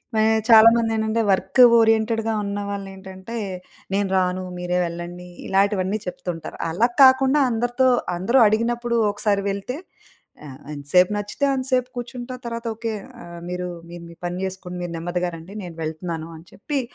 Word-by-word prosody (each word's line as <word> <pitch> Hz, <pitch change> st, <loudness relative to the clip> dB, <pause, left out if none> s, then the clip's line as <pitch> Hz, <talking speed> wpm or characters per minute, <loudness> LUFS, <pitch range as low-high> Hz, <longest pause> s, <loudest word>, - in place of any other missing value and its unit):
మే 220 Hz, -, +3 dB, 0.3 s
చాలామందేంటంటే, 225 Hz, 0 st, +5 dB
వర్క్ 195 Hz, +6 st, +1 dB, 0.2 s
ఓరియెంటెడ్‌గా 225 Hz, 0 st, +2 dB
ఉన్నవాళ్ళేంటంటే, 200 Hz, 0 st, -6 dB, 0.6 s
నేను 200 Hz, 0 st, +1 dB
రాను, 185 Hz, 0 st, 0 dB
మీరే 180 Hz, 0 st, -1 dB
వెళ్ళండీ, 175 Hz, +1 st, -7 dB, 0.2 s
ఇలాటివన్నీ 195 Hz, 0 st, +1 dB
చెప్తుంటారు. 180 Hz, -2 st, -6 dB
అలా 215 Hz, +9 st, +2 dB, 0.2 s
కాకుండా, 265 Hz, +2 st, +5 dB
అందరితో, 245 Hz, +3 st, +1 dB, 0.3 s
అందరూ 200 Hz, +9 st, +2 dB
అడిగినప్పుడూ 235 Hz, +2 st, 0 dB
ఒకసారి 205 Hz, -1 st, 0 dB
వెళ్తే, 200 Hz, +8 st, -4 dB, 0.7 s
ఆహ్, 135 Hz, -2 st, -11 dB
ఎంతసేపు 180 Hz, +7 st, +3 dB
నచ్చితే 205 Hz, +7 st, -1 dB
అంత 260 Hz, -1 st, -2 dB
సేపు 255 Hz, 0 st, +2 dB
కూర్చుంటా, 245 Hz, +1 st, -6 dB
తరవాత 230 Hz, 0 st, -5 dB
"ఓకే. 225 Hz, 0 st, -3 dB, 0.3 s
ఆహ్, 170 Hz, 0 st, -10 dB
మీరూ, 180 Hz, 0 st, -3 dB, 0.2 s
మీరు 170 Hz, 0 st, -9 dB
మీ 170 Hz, -, -14 dB
పని 175 Hz, +1 st, -4 dB
జేసుకుని, 185 Hz, -1 st, -6 dB
మీరు 170 Hz, -, -5 dB
నెమ్మదిగా 175 Hz, +1 st, -2 dB
రండి, 165 Hz, +5 st, -12 dB
నేను 170 Hz, -2 st, -9 dB
వెళ్తున్నాను." 160 Hz, +1 st, -4 dB
అని 165 Hz, -, -17 dB
చెప్పి, 280 Hz, +7 st, -3 dB
200 Hz, 140 wpm, -22 LUFS, 180-230 Hz, 0.7 s, చాలామందేంటంటే